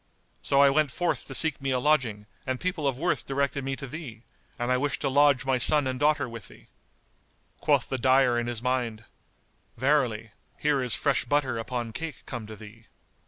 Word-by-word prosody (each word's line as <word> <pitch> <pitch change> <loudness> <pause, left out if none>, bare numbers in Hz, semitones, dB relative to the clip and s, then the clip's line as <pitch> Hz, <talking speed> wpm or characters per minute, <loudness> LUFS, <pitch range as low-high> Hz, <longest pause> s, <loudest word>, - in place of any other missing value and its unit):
So 140 0 +4
I 140 - +6
went 155 +1 +2
forth 175 +7 -2
to - - -3
seek 155 -4 +1
me 135 - -2
a 130 - +2
lodging, 125 -7 +1 0.2
and 130 -1 -1
people 180 -5 -1
of 135 -3 -1
worth 170 +6 -1
directed 140 0 -1
me 135 0 -2
to 135 - -7
thee, 135 -5 -8 0.3
and 120 +1 -1
I 125 - +3
wish 145 +2 -1
to - - -1
lodge 140 -1 +4
my 130 -1 +1
son 145 +5 +3
and 130 -1 -2
daughter 150 -1 +2
with 115 -4 -9
thee." - - -18 0.9
Quoth - - +2
the 130 - -3
dyer 130 -1 +4
in 120 - -3
his 120 -1 -4
mind, 120 -4 -1 0.7
"Verily, 120 -5 +1 0.3
here 145 -2 +1
is 125 -2 +1
fresh 140 -4 +1
butter 135 -2 0
upon 120 -1 -4
cake 165 -2 -6
come 120 -4 -6
to 110 - -8
thee." 110 +1 -14
130 Hz, 200 wpm, -27 LUFS, 120-145 Hz, 0.9 s, I